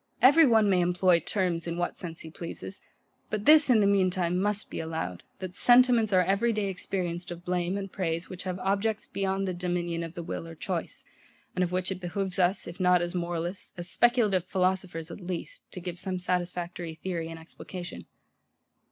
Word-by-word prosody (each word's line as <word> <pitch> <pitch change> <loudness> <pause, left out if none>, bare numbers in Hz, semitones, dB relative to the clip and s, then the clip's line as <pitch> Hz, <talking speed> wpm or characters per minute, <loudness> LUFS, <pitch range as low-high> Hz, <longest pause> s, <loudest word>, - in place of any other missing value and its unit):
Every 285 +5 +7
one 220 -3 +5
may 185 -2 +4
employ 180 0 +3
TERMS 175 -1 -1
in 170 0 -3
what 175 0 -1
sense 165 -2 -7
he 160 - -9
pleases: 175 +3 -7 0.5
but 210 -1 -3
this, 305 -1 +7
in 230 -4 +6
the - - +4
mean 200 -2 +4
time, 180 0 0
must 210 +1 -1
be - - -4
allowed, 160 - -4 0.2
that 185 -1 -6
SENTIMENTS 240 0 +5
are 185 -1 +5
every 200 +6 +2
day 210 -3 -1
experienced 180 -2 -3
of 175 0 -8
blame 180 +1 0
and 195 -1 -5
praise, 170 -2 -2
which 185 -1 -8
have 185 -1 -3
objects 200 +3 0
beyond 195 0 -1
the 185 - -1
dominion 175 -1 -2
of 165 +1 -7
the 170 - -5
will 165 - -5
or 165 - -9
choice, 175 +1 -4 0.5
and 185 - +1
of 175 - -1
which 185 +1 -1
it 185 -1 -4
behoves 185 +1 -2
us, 180 +2 +2
if 170 - -9
not 180 -1 +5
as 175 +1 -3
moralists, 175 +1 -2
as 175 0 -4
speculative 220 -7 +3
philosophers 180 -3 -1
at 190 - -8
least, 175 -1 -6
to - - -5
give 175 -1 -6
some 185 -1 -3
satisfactory 175 -2 -2
theory 165 -1 -3
and 165 - -7
explication. 175 +2 -9
180 Hz, 195 wpm, -28 LUFS, 175-195 Hz, 0.5 s, Every